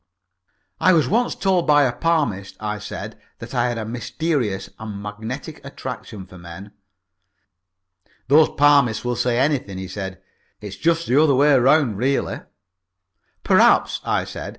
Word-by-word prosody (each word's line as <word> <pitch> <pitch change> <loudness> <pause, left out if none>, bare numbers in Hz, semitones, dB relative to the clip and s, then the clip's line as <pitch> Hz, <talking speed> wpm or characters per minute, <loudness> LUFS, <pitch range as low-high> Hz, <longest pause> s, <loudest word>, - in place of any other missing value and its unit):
"I 185 - +4
was 160 -3 +3
once 240 +4 0
told 185 -4 0
by 145 -1 +5
a 130 - +1
palmist," 140 - -1
I 105 -1 -4
said, - - -8 0.2
"that - - -10
I 120 0 +1
had 120 - -3
a 110 - -4
mysterious 120 - -3
and 110 -2 -7
magnetic 110 +9 -7
attraction 125 -7 -8
for 90 -1 -14
men." 85 +4 -11 1.6
"Those 150 +3 +5
palmists 140 -6 +3
will 120 0 -1
say 120 0 0
anything," 130 -8 0
he 95 0 -6
said. 95 0 -6 0.4
"It's 105 -1 -8
just 170 0 +1
the 135 +5 +3
other 150 -4 +3
way 145 +2 +4
round 130 -4 +3
really." 135 +3 -1 1.0
"Perhaps," - - +3
I - - 0
said. - - -7
125 Hz, 150 wpm, -21 LUFS, 105-150 Hz, 1.6 s, by